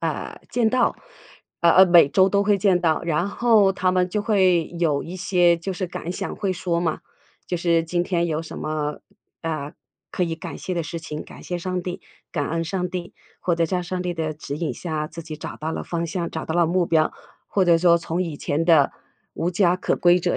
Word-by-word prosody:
啊， -, -, -4 dB
见 235 Hz, -3 st, +2 dB
到。 255 Hz, -1 st, +2 dB, 0.6 s
呃 170 Hz, -1 st, +5 dB
呃， 190 Hz, -, +8 dB
每 175 Hz, -5 st, +7 dB
周 190 Hz, +5 st, +4 dB
都 200 Hz, +1 st, +2 dB
会 205 Hz, 0 st, +3 dB
见 185 Hz, -2 st, +3 dB
到， 160 Hz, -3 st, +1 dB
然 170 Hz, +2 st, 0 dB
后 215 Hz, -3 st, +4 dB
他 185 Hz, -1 st, +1 dB
们 185 Hz, 0 st, +1 dB
就 210 Hz, +3 st, -1 dB
会 185 Hz, -6 st, +3 dB
有 150 Hz, -4 st, +1 dB
一 175 Hz, +3 st, -7 dB
些 175 Hz, -2 st, +3 dB
就 180 Hz, +4 st, -4 dB
是 185 Hz, 0 st, -4 dB
感 175 Hz, 0 st, -5 dB
想 -, -, -5 dB
会 195 Hz, -2 st, -1 dB
说 170 Hz, -1 st, -1 dB
嘛， 165 Hz, -2 st, -1 dB, 0.5 s
就 180 Hz, -, -1 dB
是 170 Hz, -1 st, +2 dB
今 175 Hz, +1 st, -1 dB
天 170 Hz, -2 st, 0 dB
有 160 Hz, -1 st, -1 dB
什 165 Hz, -, -9 dB
么 150 Hz, -1 st, -3 dB, 0.4 s
啊， 155 Hz, -3 st, -4 dB, 0.4 s
可 -, -, -1 dB
以 165 Hz, -2 st, -1 dB
感 -, -, -7 dB
谢 185 Hz, -, -5 dB
的 170 Hz, -3 st, -1 dB
事 165 Hz, +2 st, -5 dB
情， 150 Hz, -1 st, -6 dB
感 -, -, -13 dB
谢 175 Hz, -, -4 dB
上 180 Hz, 0 st, -3 dB
帝、 180 Hz, 0 st, -5 dB, 0.3 s
感 145 Hz, -4 st, -2 dB
恩 165 Hz, +1 st, -1 dB
上 180 Hz, +2 st, -2 dB
帝。 180 Hz, -1 st, -5 dB, 0.3 s
或 175 Hz, -2 st, 0 dB
者 170 Hz, -, +2 dB
在 180 Hz, +2 st, -1 dB
上 180 Hz, +1 st, -3 dB
帝 180 Hz, -1 st, -2 dB
的 155 Hz, -2 st, -2 dB
指 145 Hz, -1 st, -6 dB
引 165 Hz, 0 st, -2 dB
下， 155 Hz, -3 st, -4 dB
自 165 Hz, +1 st, -8 dB
己 155 Hz, -1 st, -7 dB
找 -, -, -7 dB
到 160 Hz, +1 st, -4 dB
了 -, -, -3 dB
方 170 Hz, -1 st, -3 dB
向、 170 Hz, +1 st, -3 dB
找 160 Hz, -, -4 dB
到 160 Hz, -, -3 dB
了 175 Hz, -, +4 dB
目 175 Hz, +1 st, +1 dB
标， 160 Hz, -2 st, +2 dB, 0.4 s
或 195 Hz, -, +2 dB
者 170 Hz, -2 st, +5 dB
说 170 Hz, 0 st, +4 dB
从 165 Hz, +2 st, -2 dB
以 165 Hz, -5 st, -5 dB
前 145 Hz, +3 st, -1 dB
的 160 Hz, -5 st, +5 dB, 0.4 s
无 170 Hz, -, -1 dB
家 180 Hz, -1 st, +3 dB
可 180 Hz, -, -1 dB
归 175 Hz, 0 st, +4 dB
者 175 Hz, -, 0 dB
175 Hz, 245 characters per minute, -23 LUFS, 165-185 Hz, 0.6 s, 呃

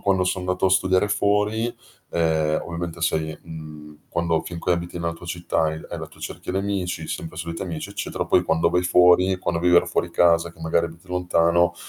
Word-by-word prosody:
quando 95 Hz, -2 st, +2 dB
son 90 Hz, 0 st, -1 dB
andato 90 Hz, +1 st, 0 dB
a -, -, +2 dB
studiare 95 Hz, +1 st, +3 dB
fuori, 105 Hz, +3 st, +1 dB, 0.4 s
ehm, 80 Hz, -2 st, +1 dB
ovviamente 85 Hz, 0 st, -5 dB
sei 80 Hz, -2 st, -1 dB
mhmm, 80 Hz, -2 st, -9 dB, 0.3 s
quando 85 Hz, -1 st, +2 dB
finchè 85 Hz, 0 st, -2 dB
abiti 85 Hz, 0 st, -3 dB
nella 85 Hz, 0 st, -2 dB
tua 85 Hz, +1 st, -12 dB
città 85 Hz, -2 st, 0 dB
e 80 Hz, -, -4 dB, 0.2 s
hai -, -, -4 dB
la -, -, -6 dB
tua -, -, -19 dB
cerchia -, -, -6 dB
di -, -, -2 dB
amici, 95 Hz, -5 st, -2 dB
sempre 80 Hz, -, -5 dB
soliti 85 Hz, 0 st, -5 dB
amici, 85 Hz, -4 st, -5 dB
eccetera, -, -, -3 dB
poi 90 Hz, -, +3 dB
quando 80 Hz, -1 st, +2 dB
vai 90 Hz, -, +2 dB
fuori, 90 Hz, +1 st, +5 dB
quando 85 Hz, -2 st, -1 dB
vivere 90 Hz, 0 st, +5 dB
fuori 85 Hz, -, -1 dB
casa 85 Hz, 0 st, +3 dB
che -, -, -24 dB
magari 80 Hz, +1 st, +1 dB
abiti 85 Hz, +2 st, -14 dB
lontano, 85 Hz, -1 st, +2 dB
85 Hz, 195 wpm, -23 LUFS, 85-90 Hz, 0.4 s, fuori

